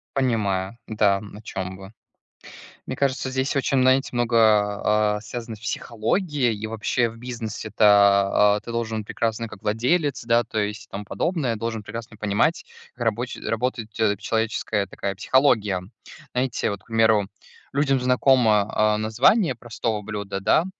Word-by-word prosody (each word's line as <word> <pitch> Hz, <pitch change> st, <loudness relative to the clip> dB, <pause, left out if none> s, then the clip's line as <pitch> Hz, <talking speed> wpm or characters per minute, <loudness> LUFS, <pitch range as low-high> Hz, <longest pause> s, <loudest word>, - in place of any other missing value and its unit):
Понимаю, 110 Hz, -5 st, 0 dB
да, 105 Hz, -2 st, +2 dB
м, 100 Hz, +1 st, -10 dB
о -, -, -11 dB
чём 95 Hz, -3 st, -5 dB
вы. 95 Hz, +1 st, -12 dB, 0.9 s
Мне 130 Hz, -, -5 dB
кажется, 135 Hz, -1 st, 0 dB
здесь 130 Hz, +2 st, -1 dB
очень, 135 Hz, -1 st, +1 dB
знаете, 130 Hz, +2 st, +3 dB
много, 120 Hz, -1 st, 0 dB, 0.8 s
а, -, -, -2 dB
а, 105 Hz, -, -8 dB
связано 115 Hz, +1 st, -6 dB
с -, -, -17 dB
психологией, 120 Hz, -, -1 dB
и 110 Hz, +1 st, -5 dB
вообще, 115 Hz, +2 st, 0 dB
в 115 Hz, -, -12 dB
бизнесе-то, 105 Hz, -3 st, +3 dB
а, -, -, -2 dB
ты 115 Hz, +2 st, -9 dB
должен 110 Hz, -2 st, -3 dB
прекрасно 115 Hz, +1 st, -2 dB
как 110 Hz, -3 st, -12 dB
владелец, 125 Hz, +7 st, 0 dB
да, 115 Hz, 0 st, +3 dB
то 110 Hz, -1 st, -4 dB
есть, 105 Hz, +1 st, -3 dB
и -, -, -41 dB
тому 100 Hz, +1 st, -6 dB
подобное, 140 Hz, -, -1 dB
должен 110 Hz, -1 st, -4 dB
прекрасно 110 Hz, +1 st, -8 dB
понимать, 105 Hz, -, 0 dB, 0.3 s
как 120 Hz, -2 st, -4 dB
рабоч 115 Hz, +3 st, -1 dB
работают 115 Hz, -1 st, -3 dB, 0.3 s
человеческая 110 Hz, -2 st, -1 dB
такая 100 Hz, +1 st, -4 dB
психология. 105 Hz, -5 st, +2 dB, 0.5 s
Знаете, 125 Hz, -2 st, 0 dB
вот, 100 Hz, -2 st, -5 dB
к -, -, -28 dB
примеру, 110 Hz, -3 st, +3 dB, 0.4 s
людям 135 Hz, -2 st, +1 dB
знакомо, 125 Hz, -5 st, +3 dB
а, 105 Hz, 0 st, +2 dB
название 125 Hz, -, +3 dB
простого 115 Hz, -2 st, -3 dB
блюда, 100 Hz, -2 st, -5 dB
да, 160 Hz, -, +3 dB
110 Hz, 155 wpm, -23 LUFS, 105-125 Hz, 0.9 s, знаете